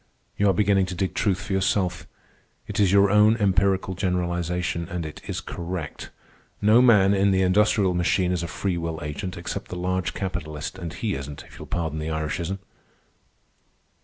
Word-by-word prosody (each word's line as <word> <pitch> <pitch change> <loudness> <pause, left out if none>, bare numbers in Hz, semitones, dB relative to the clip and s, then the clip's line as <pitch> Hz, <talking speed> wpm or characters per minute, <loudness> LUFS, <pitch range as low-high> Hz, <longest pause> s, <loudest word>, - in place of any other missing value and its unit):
You 100 0 +3
are - - +4
beginning 100 -1 +2
to 90 - -5
dig 95 +1 -1
truth 95 -4 +1
for 105 -2 -4
yourself. 95 -1 0 0.6
It - - -4
is 100 -3 +4
your 100 0 +5
own 105 +2 +5
empirical 95 -2 +2
generalization, 90 -2 -1
and 85 -2 -3
it 75 - -8
is - - -3
correct. 85 -3 -6 0.5
No 110 +4 +5
man 105 -6 +6
in 100 0 +3
the 95 -1 +3
industrial 95 0 +3
machine 90 +1 +1
is 90 -2 -1
a 85 - -3
free 90 +1 -2
will 85 -1 -3
agent, 75 +5 -5
except 85 - -5
the - - -6
large 90 0 -1
capitalist, 80 -2 -4
and 85 -3 -5
he - - -2
isn't, 70 +1 -6
if - - -15
you'll - - -9
pardon 80 -3 -2
the 75 +1 -3
Irishism. 80 +4 -2
90 Hz, 175 wpm, -24 LUFS, 85-100 Hz, 0.6 s, man